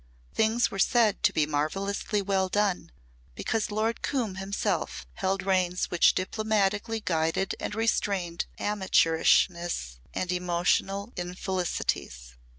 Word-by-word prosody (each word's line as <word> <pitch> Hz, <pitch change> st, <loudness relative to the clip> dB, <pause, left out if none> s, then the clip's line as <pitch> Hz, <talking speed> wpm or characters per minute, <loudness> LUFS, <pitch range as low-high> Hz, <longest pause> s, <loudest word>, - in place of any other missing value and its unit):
Things 225 Hz, +2 st, +2 dB
were 195 Hz, -, -5 dB
said 225 Hz, -1 st, +3 dB
to -, -, +4 dB
be 155 Hz, -, +2 dB
marvellously 195 Hz, +7 st, -1 dB
well 190 Hz, -1 st, +1 dB
done 200 Hz, -, 0 dB, 0.4 s
because 225 Hz, -, -1 dB
Lord 220 Hz, +2 st, -1 dB
Coombe 240 Hz, -8 st, -1 dB
himself 195 Hz, +2 st, -2 dB
held 190 Hz, 0 st, -1 dB
reins 185 Hz, -2 st, +1 dB
which 175 Hz, -, +4 dB
diplomatically 215 Hz, +2 st, 0 dB
guided 165 Hz, +1 st, 0 dB
and -, -, -4 dB
restrained 200 Hz, -6 st, 0 dB
amateurishness 170 Hz, -, +2 dB
and 185 Hz, -1 st, -2 dB
emotional 180 Hz, +4 st, 0 dB
infelicities. 175 Hz, -, -3 dB
190 Hz, 110 wpm, -28 LUFS, 175-210 Hz, 0.4 s, to